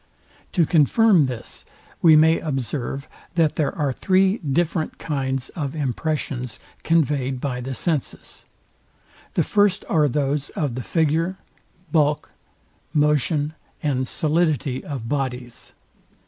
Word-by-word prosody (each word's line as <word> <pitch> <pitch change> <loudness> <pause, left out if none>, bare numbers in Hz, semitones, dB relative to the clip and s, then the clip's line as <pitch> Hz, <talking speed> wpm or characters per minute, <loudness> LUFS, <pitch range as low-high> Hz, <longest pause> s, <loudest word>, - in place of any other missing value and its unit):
To 170 -4 +4
confirm 175 - +4
this 125 -3 -6 0.4
we 160 -2 +7
may 160 +2 +5
observe, 135 -1 -3 0.3
that 165 -3 +3
there 150 -3 -1
are 145 -4 0
three 190 - +2
different 160 +2 -1
kinds 135 -4 -2
of 145 -3 -4
impressions 140 -3 -2 0.2
conveyed 140 -5 +1
by 125 -2 -3
the 130 +1 -4
senses. 155 -3 -3 0.9
The - - +3
first 205 -2 +2
are 155 -3 +3
those 145 +1 -1
of 145 -6 -1
the 130 - -4
figure, 165 +6 0 0.5
bulk, 150 -2 +1 0.6
motion 150 0 +2 0.3
and 130 -3 0
solidity 155 -4 0
of 130 -6 -5
bodies. 125 -3 -4
150 Hz, 115 wpm, -23 LUFS, 135-160 Hz, 0.9 s, we